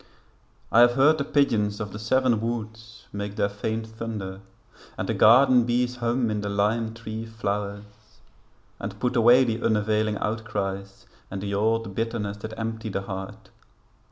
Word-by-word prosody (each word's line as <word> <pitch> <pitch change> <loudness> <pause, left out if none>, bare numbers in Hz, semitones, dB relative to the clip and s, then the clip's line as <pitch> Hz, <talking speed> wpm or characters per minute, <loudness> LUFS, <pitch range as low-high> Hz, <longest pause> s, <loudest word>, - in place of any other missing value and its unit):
I 115 - +5
have 120 0 +7
heard 145 +5 +4
the - - +1
pigeons 110 -8 +1
of 105 -2 -4
the 105 - -7
Seven 120 +1 +2
Woods 115 0 -6
Make 100 0 -4
their 100 - +1
faint 110 +2 -3
thunder, 110 -4 -6 0.6
and - - -3
the - - 0
garden 125 +2 +6
bees 125 +1 0
Hum 120 -1 0
in 105 -1 -2
the 100 - -3
lime 110 +3 0
tree 110 -1 -6
flowers; 105 -2 -3 1.0
and 100 +1 -6
put 125 +4 -1
away 120 +2 +6
The 115 -2 -2
unavailing 110 -1 +1
outcries 100 -3 -4 0.2
and 95 - -5
the 100 +1 -4
old 110 +1 0
bitterness 115 -2 -3
That 110 +1 -8
empty 110 0 -4
the 95 - -2
heart. 95 +2 -7
110 Hz, 155 wpm, -25 LUFS, 105-115 Hz, 1.0 s, have